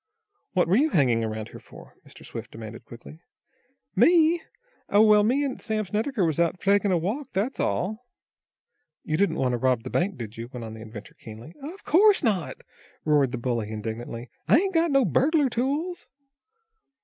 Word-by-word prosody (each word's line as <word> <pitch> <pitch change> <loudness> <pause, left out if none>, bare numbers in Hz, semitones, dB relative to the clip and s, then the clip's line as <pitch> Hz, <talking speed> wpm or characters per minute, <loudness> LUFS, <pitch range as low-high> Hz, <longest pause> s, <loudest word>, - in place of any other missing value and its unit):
"What 180 -2 +2
were 185 +5 +3
you 305 +5 +3
hanging 125 - +2
around 110 -1 -4
here - - -11
for?" - - -15
Mr. - - -15
Swift - - -8
demanded 110 0 -10
quickly. 120 +6 -12 0.8
"Me? 335 0 +4 0.5
Oh, 205 +1 +5
well, 210 -1 +6
me 250 +7 +2
an' 265 - -4
Sam 215 -2 -2
Snedecker 215 +2 -1
was 160 -1 -1
out 170 +1 +1
takin' 200 0 +2
a 180 - +3
walk. 220 - -3
That's 215 +8 -2
all." 220 +7 -2 1.0
"You 155 - -2
didn't 200 +5 +1
want 130 -1 0
to - - 0
rob 125 -2 +1
the 130 - -7
bank, 180 -1 0
did 115 -3 -8
you?" 115 +1 -6
went 125 -1 -8
on 110 - -8
the 110 - -10
inventor, 110 -1 -10
keenly. 115 +8 -12
"Of 330 +8 -9
course 400 +4 +4
not," 185 - 0 0.5
roared 145 -4 +3
the 125 - -3
bully, 120 -3 -2
indignantly. 115 +2 -6 0.2
"I - - +6
ain't 385 +3 0
got 330 0 +2
no 275 -3 +3
burglar 280 - +2
tools." 290 +9 -2
185 Hz, 185 wpm, -25 LUFS, -, 1.0 s, well